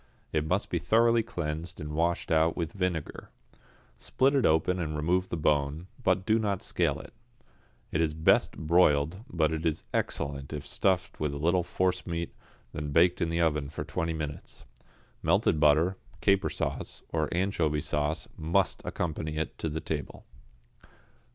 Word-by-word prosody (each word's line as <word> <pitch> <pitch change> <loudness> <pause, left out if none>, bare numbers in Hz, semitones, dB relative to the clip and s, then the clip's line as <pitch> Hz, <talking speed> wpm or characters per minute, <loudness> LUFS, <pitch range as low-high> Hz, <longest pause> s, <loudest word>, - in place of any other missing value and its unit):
It 75 -1 0
must 90 +5 0
be 85 - +1
thoroughly 115 +7 +4
cleansed 85 -5 -4
and 75 0 -5
washed 85 +2 0
out 80 0 +3
with 85 -2 -2
vinegar. 90 -5 -3 0.7
Split 135 +2 +2
it 135 -4 +4
open 90 +4 +2
and 75 -3 -2
remove 90 +5 +1
the - - -2
bone, 75 +1 +1 0.2
but 95 -4 +2
do 110 +1 +3
not 100 -3 -1
scale - - 0
it. - - -12 0.8
It 80 - +1
is 75 -2 0
best 80 0 +3
broiled, 80 +2 +3
but 80 -2 +1
is 80 0 -1
excellent 70 +1 -2
if 75 -1 -5
stuffed 95 +4 0
with 75 -2 -1
a - - -3
little 85 +5 +2
forcemeat, 90 -1 -1 0.4
then 75 0 -4
baked 85 +4 +4
in 85 - +1
the 85 +1 0
oven 75 -4 +1
for 75 - -5
twenty 80 0 -2
minutes. 75 -2 -6 0.6
Melted 80 - +2
butter, 80 +5 +4 0.2
caper 100 -1 +3
sauce, - - -4
or 80 -2 0
anchovy 85 -5 +1
sauce, 75 +2 -1
must 85 +5 +1
accompany 80 -2 -3
it 80 - -2
to 80 - -1
table. 75 -2 -5
80 Hz, 155 wpm, -29 LUFS, 75-90 Hz, 0.8 s, thoroughly